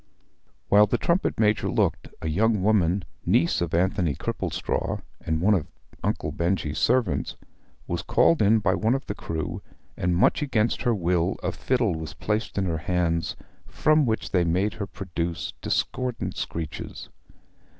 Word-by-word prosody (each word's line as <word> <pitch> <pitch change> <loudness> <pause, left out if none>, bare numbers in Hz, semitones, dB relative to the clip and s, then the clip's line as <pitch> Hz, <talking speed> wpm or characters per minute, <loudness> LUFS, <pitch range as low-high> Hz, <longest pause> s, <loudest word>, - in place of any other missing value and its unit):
While 105 +1 +6
the - - +1
trumpet 170 - 0
major 105 0 +2
looked, - - 0 0.2
a - - -1
young 105 +5 +2
woman, 95 -3 +2 0.2
niece 85 +1 +2
of 85 -2 -1
Anthony 90 -4 +1
Cripplestraw, - - -2 0.2
and 80 0 -1
one 105 +4 +4
of 85 -7 0 0.4
Uncle - - -1
Benjy's 85 -4 -1
servants, 125 -7 +1 0.5
was - - -2
called 165 - +3
in 105 +2 +5
by 100 -3 +2
one 110 +5 +2
of 135 - -4
the - - -3
crew, 80 -5 -4 0.3
and 90 0 0
much 90 - +3
against 120 -6 +1
her 120 -3 +2
will 85 -2 +1
a - - 0
fiddle 125 -7 0
was 80 -1 -6
placed 105 +1 -2
in 100 - +1
her 80 -3 -1
hands, 85 -1 0 0.3
from 155 -2 +3
which 110 -1 -1
they 90 -2 +3
made 95 +5 +1
her 100 - -5
produce 85 -4 -4
discordant 125 -2 -2
screeches. 80 -3 -5
95 Hz, 155 wpm, -25 LUFS, 85-110 Hz, 0.5 s, While